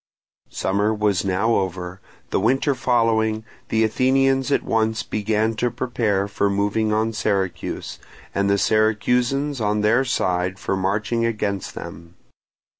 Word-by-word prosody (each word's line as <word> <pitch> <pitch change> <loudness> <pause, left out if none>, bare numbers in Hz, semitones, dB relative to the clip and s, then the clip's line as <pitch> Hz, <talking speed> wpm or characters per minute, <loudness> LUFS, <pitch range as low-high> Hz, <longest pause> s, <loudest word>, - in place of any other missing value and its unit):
Summer 100 +3 0
was 105 -3 +1
now 100 +4 +1
over. 95 -2 -2 0.3
The - - +1
winter 135 +5 +2
following, 115 -3 +1 0.2
the 110 0 +2
Athenians 135 +4 +2
at - - +2
once 110 0 0
began 110 +1 0
to 120 +2 +1
prepare 110 -5 -1
for 100 0 0
moving 105 +2 0
on 110 +1 +1
Syracuse, 100 -4 -2 0.3
and 100 0 +1
the 100 - +3
Syracusans 125 +6 +1
on 105 0 +1
their 115 +5 +3
side 90 -7 -1
for 95 - -2
marching 105 +5 -1
against 105 -4 -2
them. 85 +2 -9
110 Hz, 130 wpm, -22 LUFS, 100-115 Hz, 0.3 s, the